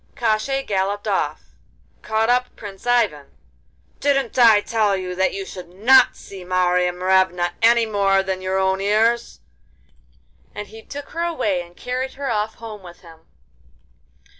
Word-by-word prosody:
Koshchei 240 Hz, +4 st, 0 dB
galloped 200 Hz, +1 st, -2 dB
off, -, -, -1 dB, 0.6 s
caught 220 Hz, +1 st, 0 dB
up 250 Hz, 0 st, 0 dB
Prince 200 Hz, +2 st, -10 dB
Ivan: 215 Hz, -13 st, +1 dB, 0.7 s
'Didn't 275 Hz, -3 st, 0 dB
I 225 Hz, -3 st, +7 dB
tell 210 Hz, -2 st, 0 dB
you 185 Hz, -1 st, -5 dB
that 190 Hz, +1 st, +1 dB
you 195 Hz, 0 st, -5 dB
should 180 Hz, -2 st, -10 dB
not 230 Hz, +9 st, +4 dB
see 190 Hz, -2 st, -11 dB
Marya 180 Hz, 0 st, +1 dB
Morevna 180 Hz, -1 st, +1 dB
any 230 Hz, 0 st, +5 dB
more 195 Hz, -2 st, +2 dB
than 190 Hz, -1 st, -3 dB
your 185 Hz, 0 st, -1 dB
own 190 Hz, 0 st, +1 dB
ears?' 220 Hz, +4 st, +1 dB, 1.1 s
And 210 Hz, -1 st, -7 dB
he 220 Hz, +1 st, -12 dB
took 285 Hz, +4 st, -9 dB
her 335 Hz, -, -5 dB
away 255 Hz, -, -1 dB
and 175 Hz, 0 st, -14 dB
carried 255 Hz, +1 st, -4 dB
her 275 Hz, -2 st, -4 dB
off 215 Hz, 0 st, -2 dB
home 220 Hz, -3 st, -9 dB
with 175 Hz, -2 st, -13 dB
him. 165 Hz, -2 st, -17 dB
205 Hz, 150 wpm, -21 LUFS, 185-235 Hz, 1.1 s, I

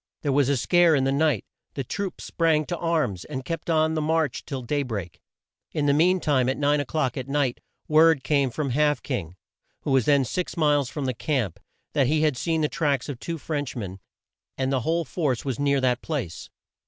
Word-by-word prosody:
There 145 Hz, -, +1 dB
was 140 Hz, -1 st, +3 dB
a 140 Hz, -, +2 dB
scare 175 Hz, +5 st, +4 dB
in 135 Hz, -, +2 dB
the 135 Hz, -, +1 dB
night. 140 Hz, -, +1 dB, 0.3 s
The 135 Hz, -, -2 dB
troops 195 Hz, -, -4 dB
sprang 160 Hz, -2 st, +1 dB
to 175 Hz, +1 st, -3 dB
arms, 155 Hz, -, 0 dB
and 130 Hz, -3 st, -6 dB
kept 165 Hz, +2 st, -4 dB
on 160 Hz, -1 st, +3 dB
the 155 Hz, -, 0 dB
march 155 Hz, -3 st, 0 dB
till 135 Hz, -3 st, -4 dB
day 145 Hz, +4 st, 0 dB
break. 105 Hz, -10 st, -5 dB, 0.5 s
In 150 Hz, -, 0 dB
the 140 Hz, -, +4 dB
mean 180 Hz, +5 st, +4 dB
time, 135 Hz, -6 st, +2 dB
at 130 Hz, -, -1 dB
nine 145 Hz, 0 st, +2 dB
o'clock 145 Hz, -2 st, -1 dB
at 130 Hz, -1 st, -4 dB
night, 140 Hz, -3 st, 0 dB, 0.3 s
word 155 Hz, -2 st, +5 dB
came 140 Hz, -1 st, +2 dB
from 140 Hz, +2 st, -3 dB
Half 150 Hz, +3 st, +2 dB
King, 95 Hz, -, -4 dB, 0.5 s
who -, -, -2 dB
was 135 Hz, -3 st, +3 dB
then 140 Hz, -3 st, +4 dB
six 180 Hz, +7 st, -3 dB
miles 145 Hz, -4 st, +2 dB
from 145 Hz, -1 st, -4 dB
the 130 Hz, -, 0 dB
camp, 115 Hz, -, -2 dB, 0.3 s
that 140 Hz, -3 st, +3 dB
he 155 Hz, +2 st, +2 dB
had 150 Hz, -3 st, +2 dB
seen 160 Hz, +5 st, 0 dB
the 150 Hz, -, +2 dB
tracks 145 Hz, -4 st, -1 dB
of 135 Hz, -5 st, -5 dB
two 165 Hz, +3 st, -4 dB
French 145 Hz, -3 st, -4 dB
men, 95 Hz, -5 st, -6 dB, 0.6 s
and 130 Hz, 0 st, 0 dB
the 130 Hz, -, +2 dB
whole 165 Hz, +6 st, 0 dB
force 140 Hz, -4 st, -1 dB
was 135 Hz, -2 st, -2 dB
near 140 Hz, -1 st, +2 dB
that 125 Hz, -1 st, +1 dB
place. 135 Hz, -, -4 dB
145 Hz, 215 wpm, -25 LUFS, 130-155 Hz, 0.6 s, word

